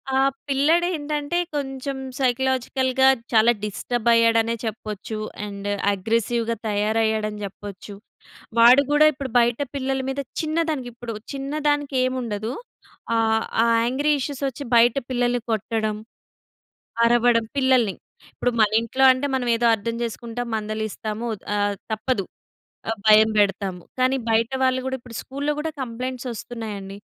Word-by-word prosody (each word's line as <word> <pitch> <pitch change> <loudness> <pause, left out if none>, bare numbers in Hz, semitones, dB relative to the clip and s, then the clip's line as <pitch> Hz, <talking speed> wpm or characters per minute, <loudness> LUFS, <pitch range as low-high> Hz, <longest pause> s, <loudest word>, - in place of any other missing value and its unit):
ఆ - - +4 0.3
పిల్లడేంటంటే 300 +1 +1 0.2
కొంచెం 270 -1 -3 0.2
సైకలాజికల్‌గా 260 +1 +1 0.2
చాలా 225 +1 +5
డిస్టర్బైయ్యాడనే 230 +1 +2
చెప్పొచ్చు, 215 -1 -5 0.3
అండ్ 200 0 -5 0.2
అగ్రెసివ్‌గా 230 +3 0
తయారయ్యాడని 215 0 0
జెప్పొచ్చు. 200 0 -8 0.7
వాడు 245 +4 +8
గూడా 295 +1 +5
ఇప్పుడు 275 -2 -6
బయట 235 +1 +2
పిల్లల 270 -1 -1
మీద 270 +1 -2 0.2
చిన్నదానికి, 310 -4 -1
ఇప్పుడు 235 -1 -6 0.2
చిన్నదానికెముండదు. 270 -6 -1 0.6
ఆహ్, 220 -1 +2 0.2
ఆ - - +4 0.2
యాంగ్రీ 270 +5 0
ఇష్యూసొచ్చి 275 0 -3
బయట 235 +1 +5
పిల్లల్ని 245 -1 +1
కొట్టడం, 220 0 -1 1.1
అరవడం 235 -1 +4
పిల్లల్ని. 255 -7 +3 0.4
ఇప్పుడు 245 - 0
మన 215 -1 +5
ఇంట్లో 245 +4 0
అంటే 255 +2 -2
మనం 250 -2 -1
ఏదో 235 +1 +1
అర్థం 230 +2 -3
చేసుకుంటాం, 235 +1 -4
మందలిస్తాము, 215 +1 -4 0.3
ఆహ్, 205 0 0 0.2
తప్పదు. 220 -1 -1 0.6
ఆ! - - +1
భయం 215 0 +7
పెడతాము. 195 -3 0 0.2
కానీ 255 +1 +3
బయట 225 +1 +2
వాళ్ళు 260 0 +2
గూడా 265 0 -2
ఇప్పుడు 240 -2 -11
స్కూల్‌లో 285 +2 -2
గూడా 315 +1 -2
కంప్లెయింట్సోస్తున్నాయండి, 230 -5 -6
240 Hz, 115 wpm, -23 LUFS, 220-265 Hz, 1.1 s, వాడు